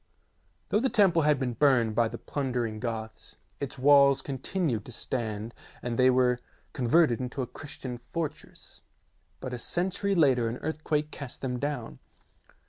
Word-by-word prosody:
Though 210 Hz, -, +3 dB
the 265 Hz, +3 st, +1 dB
temple 190 Hz, -8 st, +4 dB
had 150 Hz, -2 st, +3 dB
been 125 Hz, -3 st, -1 dB
burned 120 Hz, -3 st, +3 dB
by 115 Hz, +1 st, +3 dB
the 115 Hz, +1 st, -6 dB
plundering 125 Hz, -7 st, -2 dB
Goths, 110 Hz, -2 st, -5 dB, 0.2 s
its 140 Hz, -, -4 dB
walls 140 Hz, 0 st, +5 dB
continued 135 Hz, -, -2 dB
to -, -, -9 dB
stand 110 Hz, -2 st, -3 dB, 0.3 s
and 120 Hz, -1 st, -2 dB
they 130 Hz, 0 st, +6 dB
were 125 Hz, -1 st, +3 dB, 0.3 s
converted 125 Hz, 0 st, +3 dB
into 130 Hz, +1 st, -3 dB
a -, -, -2 dB
Christian 130 Hz, -2 st, -8 dB
fortress, 145 Hz, +6 st, -7 dB, 0.6 s
but 130 Hz, -, -5 dB
a 125 Hz, -, -4 dB
century 190 Hz, +7 st, 0 dB
later 130 Hz, -8 st, +4 dB
an 120 Hz, -, -4 dB
earthquake 155 Hz, -1 st, -2 dB
cast 140 Hz, -4 st, -7 dB
them 125 Hz, -2 st, -2 dB
down. 125 Hz, -, -4 dB
130 Hz, 150 wpm, -28 LUFS, 120-150 Hz, 0.6 s, they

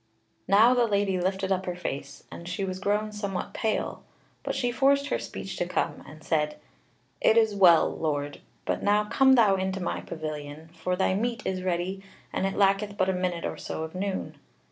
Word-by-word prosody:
Now 215 Hz, +6 st, +6 dB
the 245 Hz, -2 st, +3 dB
lady 200 Hz, -3 st, +1 dB
lifted 190 Hz, +1 st, -1 dB
up 190 Hz, 0 st, 0 dB
her 180 Hz, -, -2 dB
face, 140 Hz, -5 st, -6 dB
and 170 Hz, +1 st, -8 dB
she 190 Hz, +2 st, -2 dB
was 185 Hz, 0 st, -4 dB
grown 210 Hz, +2 st, 0 dB
somewhat 200 Hz, -3 st, -4 dB
pale; 220 Hz, -, -2 dB, 0.4 s
but -, -, -3 dB
she 245 Hz, -1 st, 0 dB
forced 280 Hz, +3 st, +3 dB
her -, -, 0 dB
speech 195 Hz, -, -6 dB
to 175 Hz, -, -1 dB
come, -, -, -2 dB
and 155 Hz, +2 st, -13 dB
said: 150 Hz, -2 st, 0 dB, 0.6 s
"It 220 Hz, -, +5 dB
is 220 Hz, -2 st, +4 dB
well, 180 Hz, -5 st, +6 dB
Lord, 145 Hz, -2 st, -2 dB, 0.2 s
but -, -, -1 dB
now 205 Hz, +1 st, +3 dB
come 265 Hz, +5 st, +4 dB
thou 215 Hz, -6 st, +5 dB
into 190 Hz, 0 st, -2 dB
my 180 Hz, -, -2 dB
pavilion, 155 Hz, -1 st, -6 dB
for 180 Hz, +1 st, -2 dB
thy 185 Hz, 0 st, +1 dB
meat 235 Hz, +5 st, -1 dB
is 185 Hz, -1 st, -1 dB
ready, 185 Hz, +1 st, -2 dB, 0.3 s
and 190 Hz, -, 0 dB
it 195 Hz, -, -3 dB
lacketh 200 Hz, +1 st, +2 dB
but 185 Hz, -, +2 dB
a -, -, +2 dB
minute 180 Hz, -2 st, -2 dB
or -, -, -3 dB
so 160 Hz, -, -5 dB
of 160 Hz, -, -7 dB
noon." 190 Hz, +1 st, -4 dB
190 Hz, 195 wpm, -27 LUFS, 175-205 Hz, 0.6 s, Now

